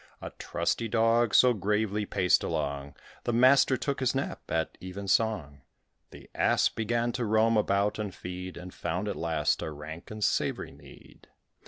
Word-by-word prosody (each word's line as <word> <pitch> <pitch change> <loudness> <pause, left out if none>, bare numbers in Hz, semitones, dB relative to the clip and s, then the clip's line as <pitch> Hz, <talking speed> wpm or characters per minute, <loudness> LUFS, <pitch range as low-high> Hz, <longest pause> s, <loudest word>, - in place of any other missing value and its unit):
A - - -7
trusty 115 - -1
Dog 115 0 +2
so 125 -1 +6
gravely 105 0 -1
paced 90 -1 +2
along, 70 0 -3 0.3
The 120 - 0
master 130 +2 +5
took 140 +1 -2
his 130 0 0
nap 135 - -3
at 80 -1 -1
even 95 +2 -7
song: 95 -10 0 0.5
The - - -14
Ass - - +3
began 120 +2 -1
to 125 0 -3
roam 110 +1 +3
about 100 0 +1
and 105 -2 -3
feed, 90 0 -7
And 90 +1 -9
found, 90 +5 -3
at 100 - -2
last, 80 -2 0
a - - -3
rank 80 +3 -9
and 110 0 -5
savoury - - 0
mead. - - -17
105 Hz, 165 wpm, -28 LUFS, 90-115 Hz, 0.5 s, so